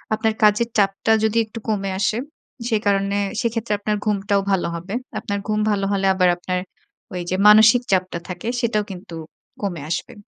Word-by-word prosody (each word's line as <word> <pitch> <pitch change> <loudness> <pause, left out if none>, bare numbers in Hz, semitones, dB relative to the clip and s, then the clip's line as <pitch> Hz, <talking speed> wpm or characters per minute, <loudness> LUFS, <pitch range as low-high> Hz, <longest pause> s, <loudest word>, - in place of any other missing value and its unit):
আপনার 220 0 0
কাজের 210 +2 +4
চাপটা 195 +2 +2
যদি 220 +1 0
একটু 220 +1 -9
কমে 195 -2 -1
আসে, 205 +2 +1 0.5
সে 225 -3 +2
কারণে 200 0 +1 0.2
সেক্ষেত্রে 230 -3 -1
আপনার 210 +1 -1
ঘুমটাও 200 -1 +1
ভালো 190 -2 +1
হবে। 175 +4 -7 0.3
আপনার 200 0 -3
ঘুম 215 0 0
ভালো 200 -1 0
হলে 195 -1 0
আবার 185 -1 +4
আপনার 180 +1 -2 0.5
ওই 180 - -3
যে, - - +1
মানসিক 220 +3 +7
চাপটা 185 -2 0
থাকে 180 +4 -6
সেটাও 225 -3 0
কিন্তু 180 -2 -9 0.5
কমে 175 -6 -3
আসবে। 170 - -3
200 Hz, 170 wpm, -21 LUFS, 190-215 Hz, 0.5 s, মানসিক